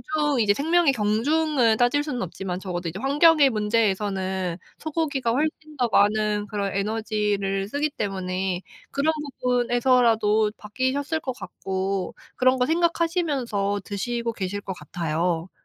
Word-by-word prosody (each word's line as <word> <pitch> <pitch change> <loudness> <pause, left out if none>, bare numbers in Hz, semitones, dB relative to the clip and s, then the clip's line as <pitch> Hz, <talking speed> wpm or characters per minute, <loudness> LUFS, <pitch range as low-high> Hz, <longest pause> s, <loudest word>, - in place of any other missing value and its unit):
경중 295 -3 +1
이제 210 -3 +4
생명의 320 +3 +3
경중을 245 +3 +2
따질 245 +5 +3
수는 270 -5 -3
없지만 180 0 -4
적어도 175 -2 -4
이제 165 - -5
환경의 290 +1 +5
문제에서는 195 -5 0 0.2
소고기가 290 -6 -1
훨씬 305 +3 -2
더 245 -2 +1
많은 210 0 +2
그런 200 -1 -2
에너지를 205 -2 -1
쓰기 290 +6 -1
때문에 185 -5 -2 0.3
그런 285 +3 +2 0.3
부분에서라도 240 -3 +3
바뀌셨을 260 +8 -2
것 265 -4 -4
같고 190 0 -3 0.2
그런 255 +1 +4
거 250 - +2
생각하시면서 310 - 0
드시고 235 +4 -3
계실 205 -1 -4
것 195 - -6
같아요. 165 +2 -2
220 Hz, 320 characters per minute, -24 LUFS, 195-280 Hz, 0.3 s, 환경의